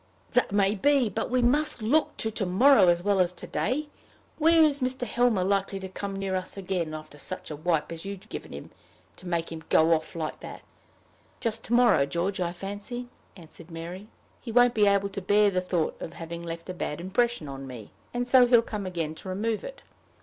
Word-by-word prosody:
"That 250 - +2
may 200 0 +3
be; 265 +3 +3
but 220 +3 -3
we 250 0 +2
must 265 -1 +1
look 295 +9 +2
to 220 - -2
to 210 -2 -2
morrow 205 +2 +6
as 175 0 +3
well 200 -1 +2
as 180 -1 +3
to - - -9
day. 295 +4 -1 0.5
When 325 +1 +6
is 290 -2 +1
Mr. 255 -1 -1
Helmer 235 -4 +2
likely 195 0 0
to 190 - -6
come 195 +1 -5
near 195 -1 -2
us 185 +1 -4
again, 180 -5 -2
after 155 -1 -10
such 185 +2 -5
a - - -4
wipe 160 +1 -1
as 165 -1 -7
you 200 +1 -4
must 195 - -12
have - - -19
given - - -7
him - - -9 0.5
to 185 - -11
make 170 -2 -2
him 160 -1 -7
go 160 +1 +5
off 160 +1 -2
like 160 -2 -4
that?" - - -9 0.8
"Just 225 -1 -2
to 235 - -2
morrow, 235 - +5
George, 185 +6 -2
I 170 -1 0
fancy," 205 +7 -6 0.3
answered 170 0 -14
Mary. 175 +4 -7 0.3
"He 235 - -6
won't 245 +1 +5
be 210 -3 +4
able 200 0 +2
to 195 0 -6
bear 205 +2 +4
the 185 -1 0
thought 180 -3 -1
of - - -6
having 170 0 -7
left 170 0 -7
a 185 - -4
bad 150 -3 -4
impression 200 0 0
on 135 0 -7
me, 120 -5 -9 0.2
and 245 0 -2
so 250 -1 +6
he'll 240 -1 +5
come 210 -4 -5
again 165 -4 -3
to 185 - -10
remove 215 +4 -2
it. - - -9
195 Hz, 220 wpm, -27 LUFS, 170-235 Hz, 0.8 s, morrow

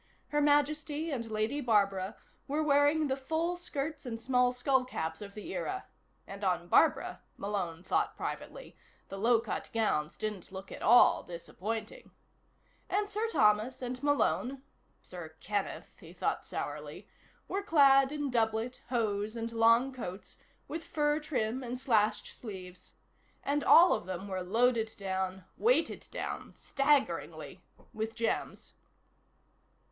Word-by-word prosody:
Her 295 0 +1
Majesty 295 +2 +1
and 230 -5 -3
Lady 220 +7 -1
Barbara 200 -5 +1 0.3
were 300 +3 0
wearing 290 +1 +4
the 265 -2 0
full 320 +6 -1
skirts 310 -3 -4
and 235 -4 -5
small 250 +1 +3
skullcaps 250 - -1
of 200 -1 -9
the 215 +12 -7
era 385 -6 -3 0.4
(and - - -9
on - - 0
Barbara, - - +3 0.2
Malone 180 -4 -3
thought - - 0
privately, - - -6 0.3
the 195 - -6
low 230 +2 +4
cut - - -4
gowns 175 -9 0
didn't 210 -5 -4
look 190 0 -8
at - - -8
all 240 +3 +6
disappointing), 215 - -6 0.8
and 410 0 0
Sir 430 +2 -1
Thomas 215 - +2
and 250 0 -4
Malone 275 -2 +1 0.4
(Sir 165 -3 -9
Kenneth, 205 -2 -3
he - - -13
thought - - -2
sourly) - - -6 0.4
were 390 - -2
clad 275 -7 +5
in 290 -2 -2
doublet, 225 +1 0
hose 215 -3 -1
and 230 0 -4
long 230 +3 +4
coats 195 -6 -7 0.3
with 325 +2 -5
fur 295 -1 +1
trim 260 -5 -2
and 250 +1 -4
slashed 215 -4 +2
sleeves. 185 -5 -10 0.5
And 285 +1 0
all 350 +2 +8
of 175 - -3
them 185 +1 -5
were 190 -1 -3
loaded 225 +3 +1
down, 190 -1 -3
weighted 485 +3 +2
down, - - -5
staggeringly, 275 0 0 0.3
with 220 +1 -3
gems. 230 - -2
240 Hz, 135 wpm, -31 LUFS, 210-290 Hz, 0.8 s, all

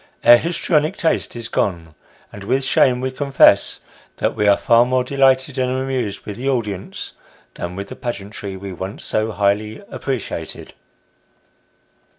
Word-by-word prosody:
Our 120 - +9
histrionic 160 0 0
taste 160 - 0
is 115 -1 -5
gone, 85 -5 -2 0.4
and 100 - -9
with 130 +6 0
shame 125 -1 +3
we 130 0 -2
con 140 +1 -5
fess, 135 - +5 0.3
that - - -1
we 105 - +1
are 100 -1 +6
far 120 -2 +4
more 125 +1 +1
delighted 135 0 +2
and 130 0 +1
amused 130 -5 -2
with 105 -1 -6
the 135 +3 -2
audience, 105 -7 -3 0.4
than 85 +1 -6
with 100 +1 -6
the - - -7
pageantry 100 -4 -6
we 95 0 -7
once 95 +3 -6
so 110 +1 0
highly 105 +1 0
appreciated. 115 - -5
120 Hz, 155 wpm, -20 LUFS, 100-130 Hz, 0.4 s, Our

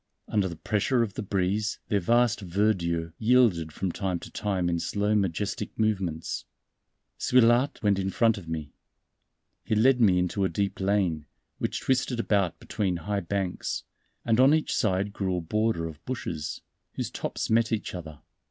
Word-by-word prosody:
Under 100 -3 +1
the 85 - -6
pressure 110 +8 +1
of 105 -4 -4
the - - -4
breeze 100 +1 0
their 100 - +2
vast 120 +4 +3
verdure 85 -4 0
yielded 110 -9 +3
from 95 +4 -2
time 95 -1 -2
to - - -10
time 95 -4 -1
in 85 -1 0
slow 105 +4 0
majestic 100 +1 -1
movements. 95 -7 -1 0.8
Suilhard 125 +2 +4
went 100 -2 +3
in 95 0 -1
front 115 +1 +2
of 85 - -13
me. 75 -3 -5 0.9
He 110 - 0
led 125 +3 +4
me 95 -5 +5
into 90 +2 0
a 95 - +2
deep 100 +3 -2
lane, 95 -6 0 0.3
which - - -2
twisted 130 -2 0
about 100 -7 +1
between 95 -5 -2
high 100 +4 -2
banks; 95 0 -3 0.4
and 115 0 +2
on 135 +4 +7
each 160 - -1
side 100 -1 0
grew 95 -3 -1
a - - -2
border 105 0 0
of 80 0 -8
bushes, 85 -12 -4 0.3
whose - - -4
tops - - -3
met 115 0 +3
each 110 -3 -2
other. 80 -4 -8
100 Hz, 165 wpm, -27 LUFS, 90-110 Hz, 0.9 s, on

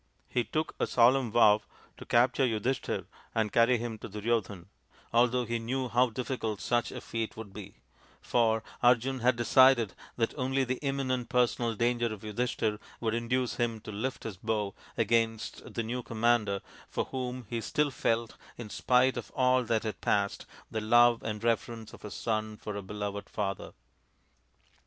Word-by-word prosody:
He 120 - 0
took 155 +8 -2
a - - +1
solemn 125 +1 +4
vow 110 -2 +6 0.4
to - - -11
capture 125 +3 +3
Yudhishthir 115 +3 -1 0.3
and 110 -2 +1
carry 120 +1 +5
him 115 -1 -5
to - - -8
io8 - - -18
THE 105 - -7
INDIAN 105 - -6
STORY 120 +1 +3
BOOK 105 - -12
Duryodhan, 90 -4 -10 0.5
although 125 +1 +3
he 115 +1 -2
knew 125 +2 -2
how 125 +3 +3
difficult 115 -3 -3
such 120 +5 0
a - - -6
feat 115 -1 -4
would 105 -3 -8
be, 100 -1 -9 0.4
for 110 -2 +1 0.2
Arjun 125 +2 +3
had 125 +1 +3
decided 120 -2 +5 0.2
that 115 -1 0
only 135 0 0
the 130 0 -2
imminent 130 -4 -1
personal 120 -2 +1
danger 120 +1 +1
of 105 -2 -7
Yudhishthir 110 -1 -1 0.2
would 110 -2 -1
induce 120 +2 -1
him 115 -2 0
to 110 - -8
lift 125 +6 -3
his 105 -4 -6
bow 105 -1 -1 0.2
against 115 0 0
the 115 - -2
new 120 +3 -3
com 115 -2 -8
mander, 110 -4 +3 0.3
for - - -1
whom 125 -1 -4
he 115 +2 -3
still 150 +5 0
felt, 115 -2 -1 0.2
in 110 -3 -8
spite 125 +1 +3
of 115 -5 -5
all 130 -1 +3
that 115 -1 0
had 110 -3 -4
passed, 100 -1 0 0.2
the 110 - -2
love 120 +2 +5
and 105 0 -4
reverence 115 -1 -1
of - - -13
a 105 - -6
son 110 0 -2
for 105 -1 -6
a 100 - -3
beloved 100 +1 -5
father. 100 -2 -3
115 Hz, 180 wpm, -30 LUFS, 110-125 Hz, 0.5 s, vow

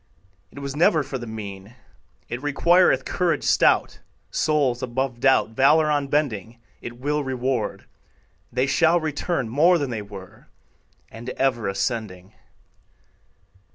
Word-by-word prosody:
It - - -19
was 140 -1 -5
never 155 -1 +3
for 135 -1 -5
the 120 - -7
mean; 105 0 -8 0.5
It 120 - -5
requireth 145 -1 +3
courage 180 -2 0
stout. - - +2 0.3
Souls 140 -5 +1
above 130 0 -3
doubt, 135 -3 +3
Valor 150 +6 +4
unbending, 135 -7 -1 0.2
It 120 0 -8
will 145 +3 -1
reward, 130 -1 -2 0.7
They 125 +2 +1
shall 165 +5 +3
return 155 -3 -2
More 160 +10 +4
than 140 -5 -3
they 110 -2 -3
were, 100 -3 -12 0.6
And 115 +3 -8
ever 130 -4 0
ascending. 100 -2 -3
130 Hz, 120 wpm, -23 LUFS, 115-150 Hz, 0.7 s, Valor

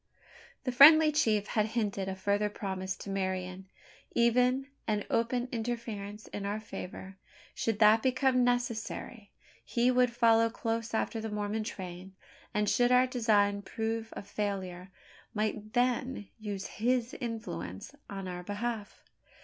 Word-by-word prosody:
The 255 - -1
friendly 305 +4 +9
chief 220 -9 +2
had 215 -1 +1
hinted 200 -3 -1
a 190 - -3
further 205 +2 0
promise 190 -2 -4
to - - -9
Marian 185 -1 -3 0.5
even 250 +3 +3 0.2
an 210 -2 0
open 240 +2 +1
interference 220 -3 -4
in 205 - -5
our 205 +2 -2
favour 190 -2 -8 0.3
should 225 -2 -1
that 215 +1 +6
become 255 0 +3
necessary. 240 -3 -2 0.3
He 245 +1 +2
would 250 0 +4
follow 230 -1 +4
close 230 0 -3
after 225 0 -1
the 220 - -4
Mormon 210 +1 -2
train; 185 -2 -7 0.4
and, 210 0 0
should 245 +4 +3
our 250 +1 +6
design 210 -5 +2
prove 225 +1 -3
a - - -7
failure, 195 -3 -4 0.5
might 215 0 -2
then 250 -2 0
use 205 -2 -4
his 245 +2 0
influence 230 -1 -5 0.2
on 195 -1 -5
our 180 -1 -5
behalf. 210 +2 -4
220 Hz, 135 wpm, -31 LUFS, 200-240 Hz, 0.5 s, friendly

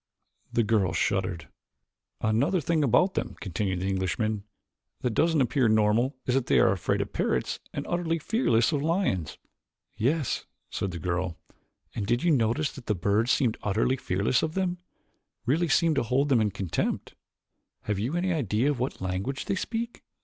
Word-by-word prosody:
The 115 - +2
girl 105 -3 +2
shuddered. 95 -4 -1 0.7
"Another 130 - +2
thing 160 0 +1
about 180 - +3
them," - - -3
continued 95 -1 -2
the 95 - -1
Englishman, 100 +3 -1 0.6
"that 125 - 0
doesn't 160 +6 +2
appear 130 -2 +2
normal 110 +5 +3
is 125 - +1
that 135 -1 +1
they - - +4
are - - +5
afraid 95 -3 0
of - - -5
parrots - - 0
and - - -4
utterly 170 -1 0
fearless 145 - +2
of 145 -3 0
lions." 155 - 0 0.6
"Yes," 140 +4 0 0.2
said 95 - -2
the 90 - -5
girl; 90 0 -2 0.6
"and 100 - -3
did 120 +2 +1
you 175 - +4
notice 125 +2 +2
that 135 - -12
the 105 - +1
birds 100 +6 +1
seem 130 -3 +3
utterly 110 +5 +1
fearless 100 0 0
of 160 0 -2
them 180 -2 -1 0.7
really 160 +8 +2
seem 165 +2 +3
to 140 - +1
hold 130 +5 +1
them 125 -5 +4
in 105 - +2
contempt? 90 -4 -2 0.7
Have 105 -2 -1
you 120 +10 -1
any 180 +1 +1
idea 130 - +1
what 130 -4 -3
language 95 +9 -3
they - - 0
speak?" 230 +4 -4
120 Hz, 170 wpm, -27 LUFS, 100-155 Hz, 0.7 s, are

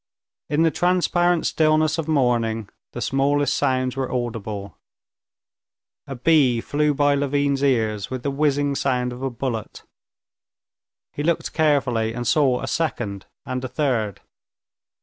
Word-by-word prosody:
In 150 +2 +2
the 165 - +3
transparent 175 -1 +2
stillness 155 0 +2
of 160 - -3
morning 120 -7 +1 0.2
the - - -5
smallest 140 +1 +1
sounds 130 -2 0
were 135 -2 -3
audible. 110 -5 -4 1.3
A 135 - -5
bee 130 -3 +3
flew 150 +4 0
by 145 0 +3
Levin's 140 0 0
ear 115 -6 +1
with 130 -2 -5
the 140 - -1
whizzing 145 0 +1
sound 125 -2 -1
of 125 - -9
a 135 - -1
bullet. 120 -3 -5 1.3
He - - -4
looked 165 +2 -1
carefully, 130 -8 +1
and 120 0 -4
saw 130 -4 +3
a - - -4
second 115 - -2 0.2
and 130 -1 -4
a - - -2
third. 120 - -1
135 Hz, 135 wpm, -22 LUFS, 120-150 Hz, 1.3 s, the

